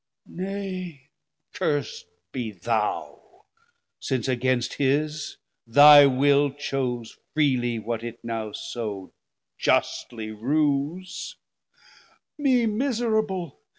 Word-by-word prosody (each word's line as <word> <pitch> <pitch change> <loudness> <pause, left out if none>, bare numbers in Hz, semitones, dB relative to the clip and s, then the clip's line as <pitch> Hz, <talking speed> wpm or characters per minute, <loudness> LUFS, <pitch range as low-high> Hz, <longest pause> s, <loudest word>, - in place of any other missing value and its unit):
70 180 - -7
Nay 185 -7 -6 0.4
curs'd 145 -1 -2 0.3
be 120 -4 -3
thou; 105 +2 -3 0.5
since 130 -1 -2
against 130 -1 0
his 150 +2 0 0.3
thy 145 +3 +9
will 140 +2 +3
Chose 130 -4 -4 0.2
freely 125 -6 +1
what 115 +1 -4
it 120 0 -6
now 115 -2 -3
so 105 -5 -6 0.5
justly 110 -3 0
rues. 145 - -1 1.0
Me 260 -5 +2
miserable! 220 - -1
140 Hz, 85 wpm, -25 LUFS, 120-170 Hz, 1.0 s, thy